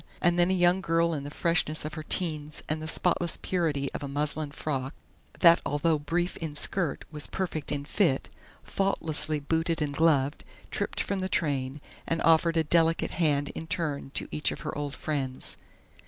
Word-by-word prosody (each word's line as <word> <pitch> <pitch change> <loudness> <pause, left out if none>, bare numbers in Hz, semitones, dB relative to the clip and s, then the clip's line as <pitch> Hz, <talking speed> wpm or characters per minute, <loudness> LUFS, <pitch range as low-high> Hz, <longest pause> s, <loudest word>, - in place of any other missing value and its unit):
And 175 0 +3
then 175 +1 +4
a - - +3
young 180 +1 +4
girl 165 -1 +2
in 140 -2 -4
the - - -5
freshness 155 -1 0
of 155 - -4
her 155 - -5
teens 155 -2 -3
and 155 +1 -2
the 155 - -5
spotless 175 +1 +1
purity 155 -7 -1
of - - -5
a 145 - -4
muslin 145 +2 -1
frock 140 -2 -3 0.5
that 170 -1 +7
although 150 +2 +1
brief 175 +5 -1
in 160 -3 -5
skirt 170 -1 0
was 150 -2 -2
perfect 170 -6 -3
in 145 -1 -2
fit, 160 -5 +1 0.4
faultlessly 160 -5 +1
booted 165 +3 0
and 150 -2 -1
gloved, 145 -3 +2 0.3
tripped - - -2
from 200 -1 -2
the 185 0 -2
train, 140 -4 0 0.3
and 165 - 0
offered 165 +1 +4
a 160 - +4
delicate 165 +1 +2
hand 145 -4 +1
in 160 - -7
turn 155 -5 -2
to - - +1
each 150 - +1
of - - -7
her - - -4
old 145 -1 -3
friends. 135 -4 -3
155 Hz, 185 wpm, -28 LUFS, 145-170 Hz, 0.5 s, that